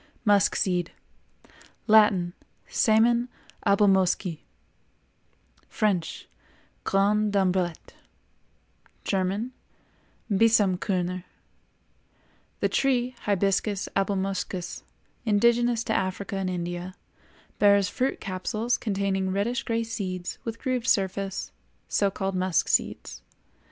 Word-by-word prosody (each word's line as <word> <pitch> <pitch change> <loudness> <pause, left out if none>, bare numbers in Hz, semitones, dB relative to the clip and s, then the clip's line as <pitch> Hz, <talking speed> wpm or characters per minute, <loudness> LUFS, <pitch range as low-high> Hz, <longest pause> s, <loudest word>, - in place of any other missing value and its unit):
MUSK 205 -2 +4
SEED. 180 -3 0 0.9
Latin—Semen 220 +3 +2 0.4
Abelmoschi; 190 -4 +3 1.3
French—Grains 205 +1 -1
d'ambrette; 185 -4 0 1.1
German—Bisamkörner. 195 -2 -1 1.4
The - - +2
tree, 255 -2 +1
Hibiscus 200 0 +1
Abelmoschus, 190 - -2 0.4
indigenous 235 +2 +3
to 220 - -1
Africa 190 +1 -2
and 190 -1 -1
India, 175 +1 -4 0.6
bears 200 -2 +5
fruit 260 +8 -1
capsules 215 +5 -2
containing 195 -2 -1
reddish 205 +6 -1
gray 230 -1 -1
seeds 185 -5 -5
with 230 -1 -5
grooved 255 -2 -2
surface, 195 -2 0 0.4
so 200 - +2
called 195 0 -3
musk 185 -2 +1
seeds. - - -1
200 Hz, 75 wpm, -26 LUFS, 185-220 Hz, 1.4 s, bears